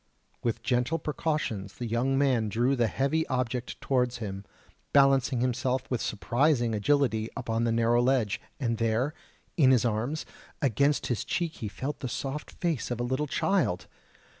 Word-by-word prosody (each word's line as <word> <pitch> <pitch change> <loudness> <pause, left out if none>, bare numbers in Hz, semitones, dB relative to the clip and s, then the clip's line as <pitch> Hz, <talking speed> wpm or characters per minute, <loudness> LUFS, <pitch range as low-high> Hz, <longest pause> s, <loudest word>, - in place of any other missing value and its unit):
With 115 -2 -2
gentle 125 +5 +1
precautions 145 -11 -2
the 120 - -5
young 120 +4 +1
man 130 -6 +2
drew 120 +6 +2
the 120 -3 +2
heavy 140 +7 0
object 125 -2 -2
towards 125 -2 +1
him, 100 -3 -6 0.5
balancing 135 -3 +4
himself 125 +1 0
with 125 - 0
surprising 120 +2 +1
agility 110 -1 +1
upon 115 +1 -1
the 115 - +1
narrow 115 +1 +3
ledge... 125 -5 +1 0.2
and 115 -4 -1
there, 115 +6 +1 0.4
in 140 -6 +6
his 125 -3 +4
arms, 120 +7 -1 0.3
against 140 +2 +2
his 120 - -1
cheek 170 -2 -2
he 110 - -4
felt 135 +8 -4
the 130 - -4
soft 135 +5 -4
face 170 -7 -2
of 120 -1 -3
a - - 0
little 130 +5 -1
child!... 175 - +1
125 Hz, 160 wpm, -28 LUFS, 115-140 Hz, 0.5 s, in